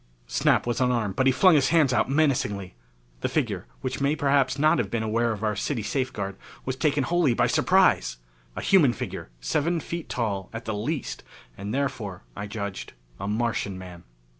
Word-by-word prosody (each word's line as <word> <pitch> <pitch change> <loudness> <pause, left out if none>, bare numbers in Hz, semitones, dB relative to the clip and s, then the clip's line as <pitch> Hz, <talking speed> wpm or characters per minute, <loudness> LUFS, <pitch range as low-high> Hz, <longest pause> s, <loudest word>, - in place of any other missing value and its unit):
Snap - - +2
was 120 +1 -1
unarmed 120 -6 +1
but 130 - +2
he - - +6
flung 185 +7 +5
his 145 -3 +4
hands 155 -5 +4
out 120 - +2
menacingly. 130 -10 +1 0.5
The - - -1
figure, - - -1
which 130 +1 -3
may 140 +2 +2
perhaps 140 -2 +2
not 155 -1 +4
have 110 -5 -1
been 110 +1 -1
aware 115 +2 +1
of 110 -1 -5
our 105 -1 +1
city 110 +3 -2
safeguard, 105 -5 -2 0.3
was 130 - -2
taken 145 0 +1
wholly 170 -6 +2
by - - +3
surprise. - - +3 0.4
A - - -4
human 155 -11 +5
figure, - - -6
seven 160 - 0
feet 170 -1 -6
tall 105 -6 -2
at 115 +1 -6
the 110 - -2
least, 120 +8 -3 0.3
and 100 +2 -5
therefore, 120 -8 -3
I 100 0 -5
judged, 100 -1 -5 0.3
a - - -4
Martian 105 -3 -1
man. 90 -2 -10
120 Hz, 185 wpm, -26 LUFS, 105-140 Hz, 0.5 s, he